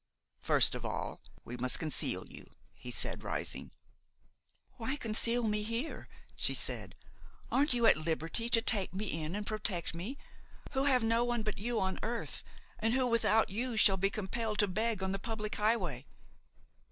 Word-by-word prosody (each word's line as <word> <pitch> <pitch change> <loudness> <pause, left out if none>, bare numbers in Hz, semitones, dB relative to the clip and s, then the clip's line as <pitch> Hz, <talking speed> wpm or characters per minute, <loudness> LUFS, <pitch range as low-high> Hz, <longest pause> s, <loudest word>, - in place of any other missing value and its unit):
"First - - +3
of - - -5
all, - - -4 0.2
we 125 - -6
must 125 +1 +1
conceal 155 -2 +1
you," - - -12 0.2
he - - -9
said, - - 0
rising. - - -4 1.1
"Why 250 +3 -2
conceal 230 -1 +2
me 210 -1 +1
here?" 230 +8 -4 0.3
she - - +1
said; - - +1 0.6
"aren't 285 +1 +3
you 235 -1 +2
at 225 - +6
liberty 165 +8 0
to 230 -1 +4
take 195 -6 +3
me 205 +3 -2 0.2
in 155 +4 -3
and 205 0 -3
protect 210 -7 -2
me, 195 +12 -5 0.5
who 270 -1 +1
have 255 -4 +4
no 230 +1 +3
one 240 -2 0
but 215 -2 -3
you 230 +2 0
on 190 0 -1
earth, 230 +2 -3 0.4
and 225 +2 +1
who, 260 -1 +3
without 225 -3 +3
you, 235 +3 -2
shall 195 -3 +7
be 195 +1 +1
compelled 215 +2 -3
to 205 - +3
beg 215 +1 -1
on 190 - 0
the 195 - -2
public 215 0 -4
highway? 185 - 0
215 Hz, 170 wpm, -33 LUFS, 190-235 Hz, 1.1 s, shall